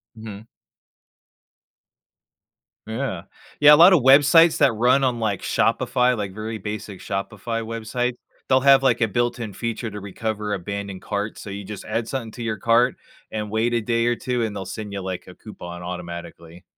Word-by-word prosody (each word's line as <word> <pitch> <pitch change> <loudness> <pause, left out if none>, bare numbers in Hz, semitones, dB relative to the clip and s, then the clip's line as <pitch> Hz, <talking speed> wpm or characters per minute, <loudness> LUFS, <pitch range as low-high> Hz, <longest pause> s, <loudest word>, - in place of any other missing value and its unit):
Mhm. 110 0 -10 2.4
Yeah. 110 -7 -4 0.4
Yeah, 150 0 +8
a - - +10
lot 175 +5 +8
of 170 - +4
websites 150 +5 +6
that 130 - +4
run 125 +5 +3
on, 125 -3 0
like, 105 -4 -1
Shopify, 125 -1 +1
like, 100 -2 -4
very 110 +1 -5
basic 105 -1 -6
Shopify 110 +3 -4
websites, 115 +2 -2 0.3
they'll 130 0 +4
have, 135 0 +6
like, 120 -3 +2
a 115 - +3
built 120 +3 -1
in 110 -4 -5
feature 115 +2 -4
to 105 - -7
recover 105 +1 -4
abandoned 100 0 -5
carts. 105 +1 -4
So 100 - -8
you 100 +1 -6
just 105 0 -8
add 115 0 -2
something 115 -5 -4
to 120 - -8
your 110 -1 -2
cart, 120 +2 +3 0.4
and 105 -1 -4
wait 115 +2 0
a 115 - +1
day 115 +1 0
or 120 - +2
2, 125 -1 -2
and 105 -2 -3
they'll 95 - -5
send 105 +2 -7
you, 100 - -4
like, 95 -1 -6
a 90 - -12
coupon 90 -5 -10
automatically. 85 -1 -8
110 Hz, 180 wpm, -23 LUFS, 100-120 Hz, 2.4 s, a